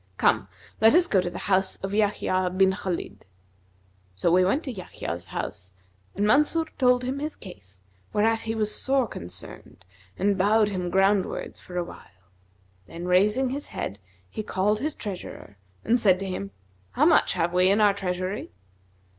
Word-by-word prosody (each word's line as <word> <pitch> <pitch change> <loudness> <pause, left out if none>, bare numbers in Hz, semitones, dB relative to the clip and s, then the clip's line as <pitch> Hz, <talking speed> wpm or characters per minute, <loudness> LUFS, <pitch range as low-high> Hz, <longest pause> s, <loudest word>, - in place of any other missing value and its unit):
Come, - - +2 0.3
let 225 +6 +6
us 350 0 +5
go 195 - +2
to 180 - -3
the - - -8
house 190 -1 +1
of 195 - -3
Yбhyб 185 -3 0
bin 190 0 +5
Khбlid.' 190 -2 -4 0.9
So 100 - +1
we 185 +1 +5
went 265 - +1
to 265 - -4
Yahya's 90 - -6
house, 95 +1 -6 0.4
and 205 - 0
Mansur 300 +8 +3
told 250 -1 +4
him 260 +2 -3
his 305 +2 -4
case, 95 - -13 0.3
whereat 225 +2 +2
he 225 0 -3
was 215 -1 0
sore 265 -2 +1
concerned 90 - -10 0.3
and 200 0 +1
bowed 210 +2 +4
him 180 -3 -3
groundwards 195 +1 +1
for 180 - -9
a 175 - +1
while, 95 - -15 0.6
then 170 +1 -7
raising 210 +8 +3
his 280 +3 -4
head, 100 - -5 0.3
he 95 - -5
called 210 +1 0
his 305 +3 -2
treasurer 180 - -8 0.3
and 240 +2 +3
said 190 -5 +4
to 195 - -5
him, 195 +1 -4 0.4
'How - - +3
much - - +4
have 170 +1 -1
we 180 +1 +4
in 200 +2 +3
our 205 -2 +5
treasury?' 185 - -3
195 Hz, 170 wpm, -25 LUFS, 180-220 Hz, 0.9 s, let